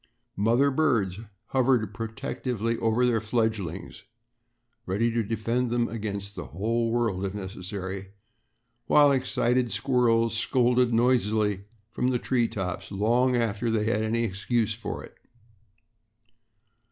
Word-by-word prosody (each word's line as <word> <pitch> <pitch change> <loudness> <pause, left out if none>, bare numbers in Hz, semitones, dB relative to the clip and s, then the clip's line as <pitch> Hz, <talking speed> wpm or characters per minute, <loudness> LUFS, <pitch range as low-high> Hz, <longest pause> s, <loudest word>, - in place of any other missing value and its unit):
Mother 120 +7 +3
birds 115 -11 +1 0.3
hovered 125 -5 +2
protectingly 115 0 -3
over 115 +2 +2
their 115 -3 +2
fledglings, 110 -6 -2 0.9
ready 110 +6 +1
to 115 0 +1
defend 115 +3 -1
them 120 0 +1
against 100 -2 -5
the - - -7
whole 115 +6 -1
world 115 -5 0
if 100 0 -3
necessary, 95 0 -6 0.8
while 145 -1 +6
excited 125 -2 +1
squirrels 115 0 +2
scolded 125 +1 +2
noisily 110 -4 +2 0.3
from 125 +2 -1
the 130 -1 +2
treetops 95 -7 -2
long 120 +5 +2
after 115 0 0
they 110 -1 +1
had 110 0 +1
any 115 +2 0
excuse 110 +2 0
for 115 - -6
it. - - -13
115 Hz, 115 wpm, -27 LUFS, 105-120 Hz, 0.9 s, while